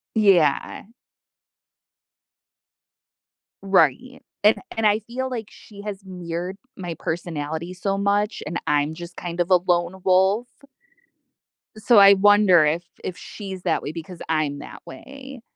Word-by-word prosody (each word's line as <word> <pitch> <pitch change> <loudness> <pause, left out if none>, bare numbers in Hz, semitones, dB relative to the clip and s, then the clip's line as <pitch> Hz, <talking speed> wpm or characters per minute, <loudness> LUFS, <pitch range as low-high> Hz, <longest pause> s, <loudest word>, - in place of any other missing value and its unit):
Yeah. 185 -9 +2 2.8
Right, 195 - +1 0.2
an 210 +1 +6 0.2
and 225 -1 +2
I 210 0 +3
feel 245 +4 -5
like 230 -4 -5
she 200 -2 -14
has 205 -2 -6
mirrored 180 0 -6 0.2
my 175 -3 -6
personality 160 0 -4
so 195 +2 -2
much, 200 +2 0
and 170 +3 -3
I'm 150 0 0
just 175 +1 -10
kind 175 0 -6
of 175 +1 0
a 180 - +8
lone 175 +1 -1
wolf. 190 +5 +3 1.3
So 215 +1 +5
I 200 0 +9
wonder 200 -4 +5
if 160 +3 0 0.2
if 180 - -5
she's 190 -3 -8
that 170 -3 0
way 145 - -5
because 170 +1 -9
I'm 155 -3 -1
that - - -11
way. 270 - -11
185 Hz, 130 wpm, -23 LUFS, 170-205 Hz, 2.8 s, I